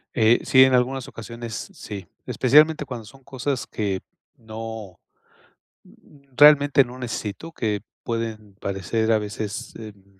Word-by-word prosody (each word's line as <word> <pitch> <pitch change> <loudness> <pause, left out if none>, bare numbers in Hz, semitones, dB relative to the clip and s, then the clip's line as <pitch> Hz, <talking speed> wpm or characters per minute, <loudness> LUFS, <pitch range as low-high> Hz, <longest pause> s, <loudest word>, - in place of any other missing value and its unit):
Eh, 115 0 +5
sí, 130 0 +7
en 130 0 +4
algunas 130 +1 +1
ocasiones 115 0 -8 0.2
sí, 100 -4 -8 0.2
especialmente 150 +4 +4
cuando 125 -4 -7
son 135 +6 -16
cosas 130 -2 -3
que 100 -3 -2 0.4
no, 110 -4 -8 0.8
mm, 140 -3 -22
realmente 145 -2 +7
no 125 +1 -10
necesito, 115 +4 -5
que 105 -9 -2 0.2
pueden 110 -3 -4
parecer, 100 +3 -1
a 110 - +5
veces, 105 +3 -5
em, 100 -3 -13
115 Hz, 130 wpm, -23 LUFS, 105-130 Hz, 0.8 s, sí